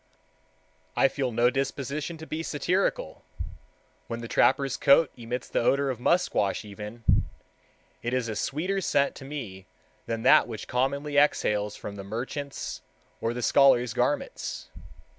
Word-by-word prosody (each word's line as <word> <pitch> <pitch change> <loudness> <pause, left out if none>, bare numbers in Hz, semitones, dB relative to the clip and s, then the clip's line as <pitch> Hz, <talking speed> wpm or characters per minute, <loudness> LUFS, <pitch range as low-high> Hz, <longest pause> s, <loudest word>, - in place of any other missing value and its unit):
I - - +5
feel 135 -2 -2
no 120 +2 +3
disposition 140 +4 -3
to 160 - -9
be 155 0 -4
satirical, 180 - -1 0.8
when 115 - -4
the 115 - -6
trapper's 135 +2 +3
coat 140 +1 +5
emits 120 +1 -5
the - - 0
odor 140 +3 +2
of 125 - -6
musquash 120 - +1
even; 105 +3 -9 1.0
it 120 - -2
is 125 -2 0
a 110 - -3
sweeter 185 - -1
scent 140 -5 +2
to 135 - -10
me 115 -10 -7 0.4
than 115 -1 -3
that - - +6
which 110 -3 -7
commonly 140 +3 0
exhales 105 -8 +2
from 100 0 -7
the 100 - -6
merchant's 125 +7 -5 0.4
or 115 +1 -1
the 125 - -3
scholar's 125 -4 +5
garments. 125 +4 -2
130 Hz, 140 wpm, -27 LUFS, 115-145 Hz, 1.0 s, that